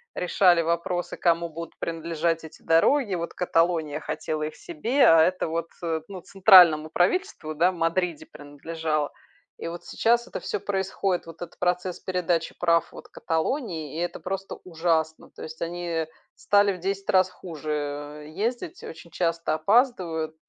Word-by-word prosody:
решали 180 Hz, -1 st, +3 dB
вопросы, 170 Hz, +2 st, -2 dB
кому 170 Hz, -1 st, +1 dB
будут 165 Hz, +1 st, -8 dB
принадлежать 165 Hz, 0 st, -2 dB
эти 160 Hz, -, -12 dB
дороги, 200 Hz, -, +3 dB
вот 170 Hz, -1 st, -4 dB
Каталония 165 Hz, -4 st, +1 dB
хотела 155 Hz, 0 st, -4 dB
их 155 Hz, -, -4 dB
себе, 285 Hz, -6 st, +1 dB
а 165 Hz, -1 st, +7 dB
это 180 Hz, +2 st, +1 dB
вот, 165 Hz, +1 st, -2 dB, 0.2 s
э, 165 Hz, -2 st, -1 dB
ну, 190 Hz, -2 st, -8 dB
центральному 180 Hz, -6 st, +6 dB
правительству, 180 Hz, -, 0 dB
да, 170 Hz, +4 st, +3 dB
в -, -, -10 dB
Мадриде 170 Hz, 0 st, -1 dB
принадлежало. 150 Hz, +1 st, -4 dB, 0.5 s
И -, -, -6 dB
вот 170 Hz, +1 st, -8 dB
сейчас 235 Hz, +1 st, +1 dB
это -, -, -6 dB
всё -, -, -3 dB
происходит, 195 Hz, -1 st, -1 dB
вот 165 Hz, -1 st, -10 dB
этот 175 Hz, -, -8 dB
процесс 180 Hz, 0 st, -1 dB
передачи 175 Hz, -3 st, -1 dB
прав 170 Hz, -1 st, +2 dB
вот -, -, -12 dB
Каталонии. 165 Hz, -, -3 dB
И -, -, -2 dB
это 175 Hz, -, -3 dB
просто 195 Hz, +1 st, -5 dB
ужасно, 160 Hz, -2 st, -1 dB
то -, -, -11 dB
есть 160 Hz, 0 st, -9 dB
они 170 Hz, -1 st, -3 dB, 0.3 s
стали 205 Hz, -1 st, +3 dB
в 180 Hz, -, -9 dB
10 195 Hz, +2 st, -3 dB
раз 185 Hz, 0 st, +4 dB
хуже, 155 Hz, -5 st, -7 dB
э, 145 Hz, 0 st, -5 dB
ездить, 250 Hz, -, -3 dB
очень 165 Hz, 0 st, -10 dB
часто 165 Hz, -2 st, -1 dB
опаздывают. 165 Hz, -, +1 dB
170 Hz, 155 wpm, -25 LUFS, 160-185 Hz, 0.5 s, а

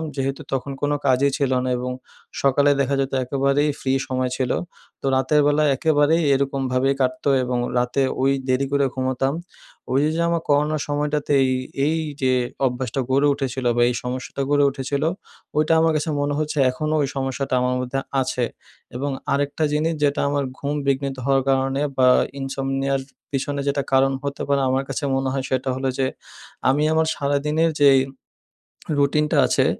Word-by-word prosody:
যেহেতু 135 Hz, +2 st, -2 dB
তখন 135 Hz, +1 st, -2 dB
কোনো 145 Hz, 0 st, +1 dB
কাজই 135 Hz, +1 st, +3 dB
ছিল 140 Hz, -3 st, 0 dB
না 130 Hz, -, -1 dB
এবং 125 Hz, +1 st, -3 dB, 0.5 s
সকালে 140 Hz, +1 st, +4 dB
দেখা 140 Hz, +1 st, 0 dB
যেতো 135 Hz, 0 st, -2 dB
একেবারেই 140 Hz, +3 st, +1 dB
ফ্রি 130 Hz, -, -1 dB, 0.2 s
সময় 130 Hz, -1 st, -1 dB
ছিলো। 130 Hz, -2 st, 0 dB, 0.4 s
তো -, -, -6 dB
রাতের 135 Hz, +3 st, +3 dB
বেলা 145 Hz, +1 st, +3 dB
একেবারেই 155 Hz, +3 st, +3 dB
এরকমভাবেই 135 Hz, -1 st, +1 dB
কাটতো 130 Hz, +2 st, 0 dB
এবং 125 Hz, 0 st, -1 dB, 0.2 s
রাতে 125 Hz, +3 st, +1 dB, 0.2 s
ওই 135 Hz, +1 st, +3 dB, 0.2 s
দেরি 130 Hz, +1 st, +1 dB
করে 140 Hz, -1 st, +2 dB
ঘুমোতাম। 130 Hz, +1 st, 0 dB, 0.6 s
ওইযে, 145 Hz, +3 st, +3 dB
যে 170 Hz, -, 0 dB
আমার 170 Hz, -1 st, 0 dB
করোনার 150 Hz, +1 st, +2 dB
সময়টাতে 145 Hz, 0 st, -1 dB
এই, 130 Hz, -, +1 dB, 0.4 s
এইযে 150 Hz, -4 st, 0 dB, 0.3 s
অভ্যাসটা 125 Hz, 0 st, -1 dB
গড়ে 140 Hz, +2 st, +3 dB
উঠেছিলো 130 Hz, -3 st, -2 dB
বা -, -, +3 dB
এই 125 Hz, -, -1 dB
সমস্যাটা 130 Hz, +2 st, -4 dB
গড়ে 145 Hz, 0 st, +3 dB
উঠেছিলো। 140 Hz, +3 st, -1 dB, 0.5 s
ওইটা 155 Hz, +2 st, +3 dB
আমার 165 Hz, 0 st, +3 dB
কাছে 155 Hz, +1 st, -1 dB
মনে 145 Hz, 0 st, 0 dB
হচ্ছে 150 Hz, 0 st, -2 dB
এখনও 155 Hz, +4 st, -2 dB
ওই 140 Hz, -, +1 dB
সমস্যাটা 135 Hz, 0 st, -2 dB
আমার 125 Hz, 0 st, +1 dB
মধ্যে 125 Hz, +2 st, -2 dB, 0.2 s
আছে। 125 Hz, -1 st, -1 dB, 0.5 s
এবং 140 Hz, +3 st, -2 dB, 0.2 s
আরেকটা 145 Hz, +2 st, 0 dB
জিনিস 160 Hz, +2 st, +1 dB
যেটা 145 Hz, 0 st, +2 dB
আমার 145 Hz, -1 st, 0 dB
ঘুম 145 Hz, +1 st, -3 dB
বিঘ্নিত 135 Hz, 0 st, 0 dB
হওয়ার 135 Hz, -1 st, +2 dB
কারণে 135 Hz, +1 st, +1 dB, 0.2 s
বা 130 Hz, -1 st, +5 dB, 0.3 s
ইনসমনিয়া 135 Hz, 0 st, -1 dB
র -, -, -6 dB, 0.3 s
পিছনে 140 Hz, +1 st, -2 dB
যেটা 140 Hz, 0 st, +1 dB
কারণ 135 Hz, 0 st, +4 dB
হতে 140 Hz, 0 st, -4 dB
পারে 140 Hz, -1 st, +2 dB
আমার 130 Hz, +1 st, +1 dB
কাছে -, -, -3 dB
মনে 135 Hz, 0 st, 0 dB
হয়, 135 Hz, -1 st, -2 dB
সেটা 130 Hz, 0 st, -1 dB
হলো 130 Hz, 0 st, -1 dB
যে 135 Hz, -, +1 dB, 0.6 s
আমি 145 Hz, +3 st, +2 dB
আমার 160 Hz, 0 st, +2 dB
সারাদিনের 150 Hz, +3 st, +1 dB
যেই 135 Hz, -2 st, +7 dB, 1.0 s
রুটিনটা 150 Hz, +2 st, +2 dB
আছে। -, -, +2 dB
140 Hz, 165 wpm, -22 LUFS, 130-145 Hz, 1.0 s, যেই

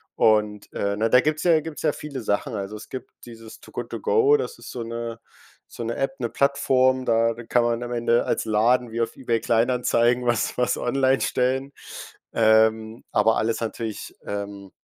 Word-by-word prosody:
Und, 105 Hz, -1 st, +2 dB
äh, 100 Hz, 0 st, -1 dB
na, 110 Hz, +2 st, +1 dB
da 125 Hz, -, +6 dB
gibt's 155 Hz, +2 st, -1 dB
ja 170 Hz, -3 st, +5 dB
gibt's 155 Hz, -1 st, -7 dB
ja 155 Hz, -, +2 dB
viele 140 Hz, -3 st, -7 dB
Sachen. 110 Hz, +5 st, -1 dB
Also, 100 Hz, +1 st, -5 dB
es 105 Hz, -, -11 dB
gibt 130 Hz, -, -8 dB
dieses 115 Hz, -2 st, -12 dB
Too -, -, -16 dB
Good -, -, -5 dB
To -, -, -5 dB
Go, 445 Hz, -2 st, +4 dB
das 460 Hz, -, -5 dB
ist -, -, -10 dB
so 125 Hz, -, -5 dB
'ne 115 Hz, 0 st, -5 dB, 0.5 s
so 120 Hz, -, -8 dB
'ne 115 Hz, +1 st, -3 dB
App, 135 Hz, 0 st, -2 dB
'ne 120 Hz, -, -1 dB
Plattform, 130 Hz, -1 st, +2 dB
da 115 Hz, 0 st, +2 dB, 0.2 s
kann 120 Hz, -, +3 dB
man 120 Hz, 0 st, 0 dB
am 120 Hz, -, -6 dB
Ende 120 Hz, 0 st, +2 dB
als -, -, -1 dB
Laden 115 Hz, +3 st, +2 dB
wie 115 Hz, -, -1 dB
auf 115 Hz, 0 st, -3 dB
eBay 120 Hz, -3 st, -1 dB
Kleinanzeigen, 120 Hz, +1 st, +2 dB
was 120 Hz, -3 st, 0 dB
was 125 Hz, -, +1 dB
online 135 Hz, +2 st, +1 dB
stellen. 130 Hz, +2 st, 0 dB, 0.6 s
Ähm, 110 Hz, +1 st, +3 dB
aber 115 Hz, -, +3 dB
alles 110 Hz, +1 st, 0 dB
natürlich, 115 Hz, -1 st, -5 dB
ähm 100 Hz, -1 st, -6 dB
120 Hz, 190 wpm, -24 LUFS, 110-130 Hz, 0.6 s, da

